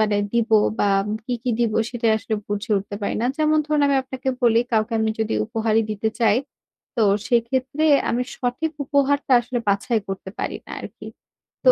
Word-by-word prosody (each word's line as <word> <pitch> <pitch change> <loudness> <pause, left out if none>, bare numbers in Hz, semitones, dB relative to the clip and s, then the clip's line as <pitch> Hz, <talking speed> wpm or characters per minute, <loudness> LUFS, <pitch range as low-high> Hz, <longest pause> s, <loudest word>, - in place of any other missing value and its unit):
মানে 210 -1 +2 0.2
দিব 235 -1 +1 0.3
বা - - +2 0.4
কি, 250 - -2
কি 250 - 0
দিব 230 -2 +2 0.2
সেটাই 230 -2 +1
আসলে 220 - -3
বুঝে 205 +3 -3
উঠতে 200 +1 -7
পারি - - -1
না। 240 - +1
যেমন 310 0 +3
ধরুন 300 -1 +1
আমি 280 -1 +3
আপনাকে 260 0 -5
বলি 230 -1 +5
কাউকে 220 +1 +1
আমি 220 0 +1
যদি 220 0 -1
উপহারই 225 0 +1
দিতে 215 +1 -1
চাই 225 -2 +4 0.6
তো 225 - +2 0.3
সেক্ষেত্রে 255 +5 0 0.3
আমি 245 - 0
সঠিক 255 +6 -2
উপহারটা 280 -1 +1
আসলে 245 +1 -3
বাছাই 210 +3 +1
করতে 190 0 -5
পারি - - -2
না - - -13
আরকি। - - -10 0.6
তো - - +9
235 Hz, 180 wpm, -22 LUFS, 220-265 Hz, 0.6 s, তো